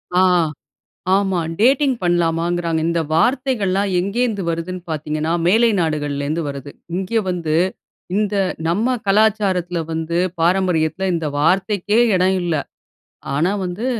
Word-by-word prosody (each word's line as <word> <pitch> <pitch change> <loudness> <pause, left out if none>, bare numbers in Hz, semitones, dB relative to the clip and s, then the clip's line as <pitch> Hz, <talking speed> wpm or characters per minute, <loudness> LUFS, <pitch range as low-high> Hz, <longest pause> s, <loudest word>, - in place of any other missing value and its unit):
ஆ, 185 - +5 0.9
ஆமா. 190 -3 +1 0.2
டேட்டிங் 265 +2 +4
பண்ணலாமாங்கிறாங்க. 170 -1 0
இந்த 170 0 +1
வார்த்தைகள்லாம், 205 -2 +1
எங்கேருந்து 205 +1 -1
வருதுன்னு 170 +2 -4
பார்த்தீங்கணா, 155 +1 -2 0.2
மேலை 230 +5 +4
நாடுகள்லேருந்து 150 0 -2
வருது. 140 0 -7 0.2
இங்க 195 +4 0
வந்து 165 -3 -1 0.6
இந்த 210 -1 0 0.3
நம்ம 225 +9 +1
கலாச்சாரத்தில 195 -4 +2
வந்து, 160 +1 -2 0.2
பாரம்பரியத்தில 180 0 +1
இந்த 160 -2 -2
வார்த்தைக்கே 195 +6 +2 0.2
எடம் 185 +1 +2
இல்லை. 165 -4 0 0.7
ஆனா 165 +7 +1
வந்து, 185 +7 -4
180 Hz, 105 wpm, -19 LUFS, 165-205 Hz, 0.9 s, ஆ